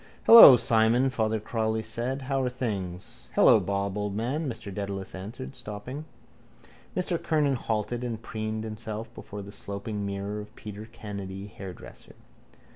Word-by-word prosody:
—Hello, 225 - +11
Simon, 115 +3 +3
Father 110 -2 0
Cowley 110 0 -1
said. 120 +5 -3
How 135 0 0
are 125 - 0
things? 100 -8 -5
—Hello, - - +7
Bob, 100 +1 -2
old 105 -1 -2
man, 135 +8 -1
Mr 110 -4 -7
Dedalus 100 -1 -5
answered, 95 - -7
stopping. 125 +8 -7 0.9
Mr 180 -2 0
Kernan 150 -3 +2
halted 120 0 -2
and 115 -3 -3
preened 110 -1 -4
himself 110 0 -6
before 100 0 -8
the 100 - -10
sloping 100 +1 -5
mirror 100 +1 -3
of 105 - -10
Peter 105 +1 -9
Kennedy, 100 -4 -7
hairdresser. 95 -2 -11
110 Hz, 140 wpm, -27 LUFS, 100-120 Hz, 0.9 s, Hello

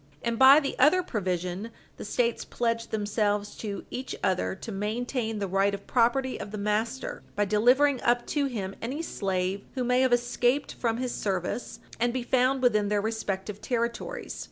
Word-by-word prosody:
And 235 -1 -1
by 270 +2 +9
the 280 -2 -2
other 335 +7 +5
provision 185 - -2 0.3
the - - -7
States 235 +2 0
pledge 230 -1 -1
themselves 205 -1 -1
to 205 -3 -5
each 255 +1 -4
other 185 0 +1
to 220 - -8
maintain 220 +3 -2
the 200 -1 -2
right 195 +2 +2
of 200 - -11
property 255 +2 +1
of - - -6
the 210 - -6
master 210 +5 -2
by 205 - +2
delivering 250 +7 +4
up 240 0 +2
to 285 -2 +1
him 195 -7 -4
any 270 +8 -3
slave 190 - -2
who 255 - -1
may 250 +1 +3
have 260 -1 +3
escaped 245 +2 +1
from 230 -2 -1
his 250 -1 -2
service, 190 +3 -3 0.2
and 240 +1 +1
be 255 -1 -2
found 255 +2 +2
within 210 -4 +3
their 210 0 +2
respective 210 -2 -3
territories. 235 - -3
230 Hz, 175 wpm, -27 LUFS, 205-250 Hz, 0.3 s, by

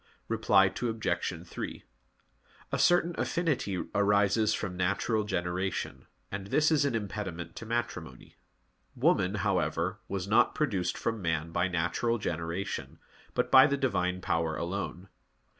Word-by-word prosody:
Reply 110 -3 +4
Obj. 95 -6 -2
3: - - -6 0.9
A - - 0
certain 175 -1 +4
affinity 140 - 0
arises 100 +1 +3
from 95 -4 -4
natural 100 +4 0
generation, 90 0 -2 0.2
and 100 -1 -5
this 150 +9 +3
is 150 -2 +3
an 140 - 0
impediment 100 -5 -4
to 115 - -7
matrimony. 90 - -4 0.6
Woman, 95 +2 +2
however, 90 0 0
was 95 -1 -3
not 115 +4 +4
produced 105 - 0
from 115 -2 -2
man 80 -1 -1
by 90 +2 +1
natural 90 +7 0
generation, 85 -1 -4 0.4
but - - 0
by 130 +1 +9
the 140 -1 0
Divine 90 -9 0
Power 80 -2 0
alone. 90 +1 -4
100 Hz, 125 wpm, -30 LUFS, 90-115 Hz, 0.9 s, by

